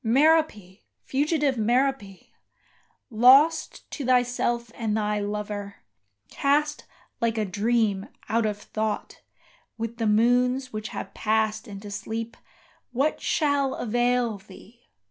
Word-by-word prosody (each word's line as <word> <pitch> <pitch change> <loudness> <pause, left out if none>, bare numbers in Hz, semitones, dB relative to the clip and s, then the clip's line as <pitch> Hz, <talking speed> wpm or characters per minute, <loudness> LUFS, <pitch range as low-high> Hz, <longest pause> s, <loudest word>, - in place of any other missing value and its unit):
Merope 250 - +2 0.3
fugitive 285 -2 0
Merope! 235 -4 0 0.9
lost 270 +8 +4
to 290 - -5
thyself 245 -2 +1
and 220 -2 -2
thy 210 -1 0
lover, 205 -1 -4 0.5
Cast, 295 - 0 0.4
like 230 -1 0
a 215 - 0
dream, 205 0 0 0.2
out 225 +1 +1
of 210 -1 -3
thought, 215 0 -4 0.6
with 230 +1 -5
the 225 -2 0
moons 250 +4 +2
which 215 0 -4
have - - -7
passed 220 +1 0
into 205 0 -9
sleep, 225 +3 -5 0.6
What 275 +5 0
shall 285 -4 +1
avail 240 -1 0
thee? 215 +4 -17
230 Hz, 110 wpm, -25 LUFS, 210-255 Hz, 0.9 s, lost